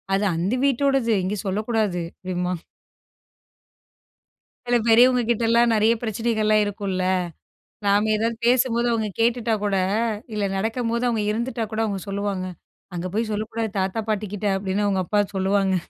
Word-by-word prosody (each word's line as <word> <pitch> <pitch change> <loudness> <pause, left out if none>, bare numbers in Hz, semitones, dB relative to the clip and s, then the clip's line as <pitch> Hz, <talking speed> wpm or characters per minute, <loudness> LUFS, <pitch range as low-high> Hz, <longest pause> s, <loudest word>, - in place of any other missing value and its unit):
அது 200 +2 +1
அந்த 180 +7 -1
வீட்டோடது, 270 -3 +2
இங்க 195 +3 -1
சொல்லக்கூடாது 210 -2 0 0.2
அப்படிம்பான். 180 -1 -3 2.0
சில 245 0 +3
பெரியவங்க 245 +2 +6
கிட்டலாம் 235 0 +3
நிறைய 220 +2 +4
பிரச்சனைகள்லாம் 220 -1 +1
இருக்குல, 195 -2 -2 0.8
நாம் 205 +2 +3
ஏதாவது 225 +2 0
பேசும்போது 240 -1 +3
அவங்க 220 -2 0
கேட்டுட்டா 230 -1 +2
கூட, 200 -1 +1 0.6
இல்ல 210 -1 -1
நடக்கும்போது 230 +3 -1
அவங்க 225 -3 0
இருந்துட்டா 235 0 -2
கூட, 220 - -2
அவங்க 200 -2 -3
சொல்லுவாங்க, 200 -2 -2 0.5
அங்க 175 +1 -3
போய் 220 +1 -1
சொல்லக்கூடாது 220 +1 -3
தாத்தா 190 +4 -1
பாட்டி 215 0 -1
கிட்ட, 205 0 -1
அப்படின்னு 195 +1 -1
அவங்க 190 -2 +1
அப்பா 210 +2 +2 0.2
சொல்லுவாங்க. 190 0 +2
215 Hz, 130 wpm, -23 LUFS, 195-230 Hz, 2.0 s, பெரியவங்க